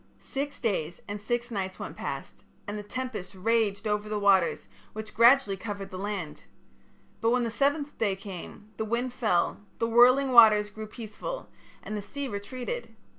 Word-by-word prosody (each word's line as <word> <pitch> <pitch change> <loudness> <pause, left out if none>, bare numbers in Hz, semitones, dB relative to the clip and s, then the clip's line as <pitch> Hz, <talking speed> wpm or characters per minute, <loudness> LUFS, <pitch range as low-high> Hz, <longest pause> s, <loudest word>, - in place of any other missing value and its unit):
"Six 285 +1 -4
days 180 - -1
and 205 0 -5
six 240 +3 -2
nights 190 -3 -3
went - - -6
past, - - -6 0.2
and 205 - -3
the 210 - -4
tempest 210 -3 -5
raged 210 0 +1
over 210 0 -1
the 215 - -1
waters 195 - +3 0.3
which 215 0 -7
gradually 235 -3 +6
covered 200 0 -6
the 185 - -6
land. 195 -6 -4 0.7
But 225 - +2
when 245 +1 +2
the 230 - -1
seventh 285 +4 0
day 205 -4 +2
came, 195 +1 -9
the - - -1
wind 240 +3 -1
fell, 215 -7 +1 0.2
the 230 - 0
whirling 250 +4 +6
waters 215 -3 +7
grew 215 0 -7
peaceful, 225 - -7 0.3
and 215 - -5
the 210 - -3
sea 280 +7 -5
retreated. 255 - -5
215 Hz, 170 wpm, -28 LUFS, 200-245 Hz, 0.7 s, waters